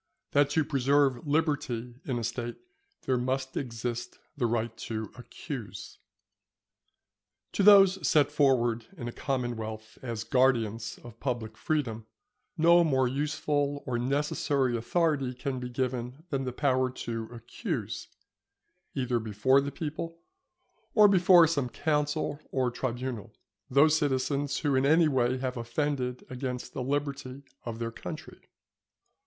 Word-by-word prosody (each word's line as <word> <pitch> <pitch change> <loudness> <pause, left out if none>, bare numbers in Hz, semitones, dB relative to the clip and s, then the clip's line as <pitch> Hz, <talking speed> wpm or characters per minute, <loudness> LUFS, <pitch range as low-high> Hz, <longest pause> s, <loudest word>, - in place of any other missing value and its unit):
—That 145 0 +4
to 155 +2 +2
preserve 140 -1 +2
Liberty 145 -6 0
in 130 -3 -1
a 120 - -3
State 120 +1 -3 0.5
there 130 -2 +1
must 130 +1 -2
exist 120 -2 -4 0.2
the 125 -5 +1
Right 115 0 -1
to 110 -2 -5
accuse. 125 -1 -8 1.5
To - - 0
those 195 -1 +7
set 145 -2 +4
forward 120 -6 +2
in 120 - -5
a - - -3
commonwealth 115 -5 -4
as 115 -3 -4
guardians 115 -3 +1
of 120 -1 -12
public 120 -5 -3
freedom, 115 -5 -2 0.5
no 170 +2 +6
more 130 -5 +2
useful 145 +1 -1
or 120 -2 -1
necessary 140 0 0
authority 135 +1 0
can 130 0 -3
be 125 0 -5
given 125 +2 -3
than 135 -2 -1
the 125 - -2
power 130 -1 +1
to 115 -3 -5
accuse, 115 -2 -5 0.9
either 125 -2 0
before 110 +5 +3
the 140 +1 -3
people, 165 +1 -5 0.8
or 210 -2 +8
before 180 -3 +7
some 145 -6 0
council 150 +1 -1
or 130 -2 0
tribunal, 120 -3 -4 0.3
those 150 +4 +5
citizens 140 0 0
who 145 -3 +1
in 130 0 +3
any 160 +4 +5
way 130 -3 +1
have 130 0 -3
offended 125 +1 -2
against 125 -1 -5
the - - -3
liberty 140 0 -3 0.2
of 115 -2 -4
their 115 0 -3
country. - - -8
130 Hz, 130 wpm, -29 LUFS, 120-145 Hz, 1.5 s, or